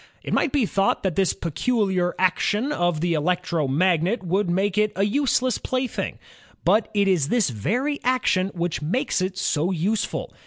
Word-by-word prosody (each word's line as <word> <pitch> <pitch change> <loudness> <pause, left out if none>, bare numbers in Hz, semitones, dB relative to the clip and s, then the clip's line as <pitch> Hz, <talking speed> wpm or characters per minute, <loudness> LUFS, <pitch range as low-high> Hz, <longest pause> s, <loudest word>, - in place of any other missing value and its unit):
It - - -4
might 310 - +2
be 280 -6 +2
thought 195 0 0
that 190 -5 -1
this 195 -2 +2
peculiar 185 - -1
action 205 +7 +1
of 175 - 0
the 175 0 +1
electromagnet 170 - +1
would 185 +2 0
make 190 +2 0
it 210 0 +2
a 195 - +1
useless 255 +2 +1
plaything, 255 -2 -3 0.5
but 215 0 +3
it 200 -1 +3
is 175 -8 +2
this 230 - +1
very 245 - -1
action 240 -7 +1
which 170 -2 -2
maies 195 - -1
it 185 0 -2
so 170 -2 0
useful. 195 +5 -2
190 Hz, 160 wpm, -23 LUFS, 175-225 Hz, 0.5 s, but